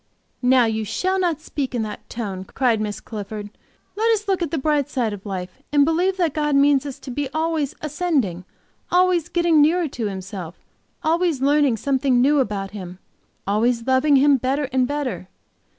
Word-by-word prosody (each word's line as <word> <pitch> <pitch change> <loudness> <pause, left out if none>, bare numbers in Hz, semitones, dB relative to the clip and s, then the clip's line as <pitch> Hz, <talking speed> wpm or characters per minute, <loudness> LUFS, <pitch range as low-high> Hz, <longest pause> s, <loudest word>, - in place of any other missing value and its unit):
"Now 250 -1 +5
you 220 -1 -1
shall 370 - -1
not 340 -5 0
speak 275 -4 -4
in 230 - 0
that 210 -1 -8
tone," 200 -5 -5
cried 230 +2 0
Miss 210 -1 -3
Clifford. 210 -1 -7 0.4
"Let 450 +2 +2
us 425 -1 -2
look 385 -2 +1
at 335 - -1
the 320 - -2
bright 290 -1 +1
side 240 -7 -1
of 205 0 -9
life, 185 +3 -6
and 290 -1 +5
believe 355 +4 +1
that 340 -6 +1
God 295 -1 0
means 280 0 +4
us 275 - -6
to 260 - -9
be 280 +2 -3
always 315 -3 -1
ascending, 290 - -1 0.5
always 355 -2 +2
getting 340 -3 +3
nearer 330 +3 +3
to 230 -4 -3
Himself, 190 -3 -6 0.5
always 330 -2 +1
learning 280 -3 +3
something 265 0 +1
new 285 +4 +4
about 200 -6 -2
Him, 185 -3 -8 0.5
always 230 +4 +1
loving 265 +3 +3
Him 280 +1 +5
better 265 +4 -1
and 255 -1 +2
better. 255 -11 -3
270 Hz, 180 wpm, -22 LUFS, 220-310 Hz, 0.5 s, Now